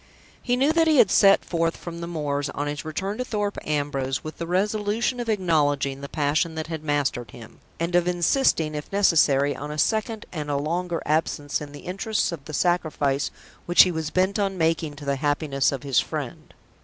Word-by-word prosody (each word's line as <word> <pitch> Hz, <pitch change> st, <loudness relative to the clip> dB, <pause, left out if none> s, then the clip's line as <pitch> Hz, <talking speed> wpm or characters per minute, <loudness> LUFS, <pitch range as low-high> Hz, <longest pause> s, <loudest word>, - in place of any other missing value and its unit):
He 245 Hz, -, +1 dB
knew 275 Hz, +5 st, +2 dB
that 330 Hz, 0 st, +3 dB
he 310 Hz, -2 st, +4 dB
had 210 Hz, -, +6 dB
set 195 Hz, -1 st, +5 dB
forth 165 Hz, -1 st, -1 dB
from 170 Hz, -1 st, -8 dB
the 170 Hz, -, -4 dB
moors 145 Hz, -4 st, -2 dB
on 145 Hz, -, -2 dB
his 145 Hz, 0 st, -4 dB
return 190 Hz, +8 st, -4 dB
to -, -, 0 dB
Thorpe 205 Hz, -4 st, -2 dB
Ambrose 140 Hz, -3 st, -2 dB
with 155 Hz, -, -8 dB
the 170 Hz, -, -4 dB
resolution 210 Hz, +6 st, 0 dB
of 240 Hz, -1 st, -3 dB
acknowledging 145 Hz, -8 st, +1 dB
the 140 Hz, -, -7 dB
passion 155 Hz, +2 st, 0 dB
that 160 Hz, 0 st, -3 dB
had 160 Hz, -2 st, -6 dB
mastered 145 Hz, -5 st, -1 dB
him, 115 Hz, -2 st, -13 dB, 0.2 s
and 170 Hz, +1 st, -2 dB
of 175 Hz, 0 st, +3 dB
insisting, 175 Hz, -, +2 dB
if 150 Hz, -1 st, -6 dB
necessary, 150 Hz, -8 st, +3 dB
on 145 Hz, -, -6 dB
a 150 Hz, -, -5 dB
second 220 Hz, +5 st, 0 dB
and 150 Hz, -4 st, -5 dB
a 145 Hz, -, 0 dB
longer 170 Hz, +3 st, -2 dB
absence 150 Hz, -1 st, 0 dB
in 145 Hz, -1 st, -7 dB
the 145 Hz, -, -10 dB
interests 195 Hz, +3 st, -1 dB
of 150 Hz, -5 st, -7 dB
the 155 Hz, -, -8 dB
sacrifice 150 Hz, -5 st, 0 dB, 0.4 s
which 175 Hz, -, +8 dB
he 185 Hz, -, 0 dB
was 160 Hz, -2 st, -3 dB
bent 190 Hz, +4 st, +1 dB
on 195 Hz, -2 st, -1 dB
making 160 Hz, -2 st, 0 dB
to 145 Hz, 0 st, -10 dB
the 140 Hz, -1 st, 0 dB
happiness 145 Hz, -1 st, +1 dB
of 135 Hz, -1 st, -5 dB
his 135 Hz, -3 st, +2 dB
friend. -, -, -5 dB
160 Hz, 205 wpm, -24 LUFS, 145-190 Hz, 0.4 s, which